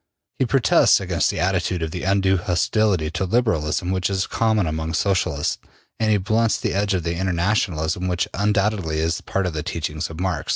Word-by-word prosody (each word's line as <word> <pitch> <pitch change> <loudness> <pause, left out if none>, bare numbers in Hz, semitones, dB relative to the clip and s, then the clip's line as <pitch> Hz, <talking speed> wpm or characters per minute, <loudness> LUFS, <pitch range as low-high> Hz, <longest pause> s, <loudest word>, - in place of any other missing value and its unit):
He 130 - +2
protests 135 -1 +4
against - - 0
the - - -3
attitude 90 -1 0
of 80 - -4
undue 95 +1 +1
hostility 90 -1 +1
to 90 - -2
Liberalism 90 -6 0
which 95 0 0
is 95 -1 0
common 110 -4 +1
among 80 +1 -3
Socialists, 90 -6 0 0.4
and 110 -1 +1
he 105 - +4
blunts 110 +3 +1
the - - -2
edge 100 0 +1
of 90 - -2
the 85 - -1
Internationalism 90 -2 0
which 90 -1 0
undoubtedly 100 -5 0
is 80 +1 -1
part 95 -1 -2
of 90 - -2
the 75 - -3
teachings 80 0 -4
of 80 0 -9
Marx. 90 -5 -2
95 Hz, 180 wpm, -22 LUFS, 80-100 Hz, 0.4 s, protests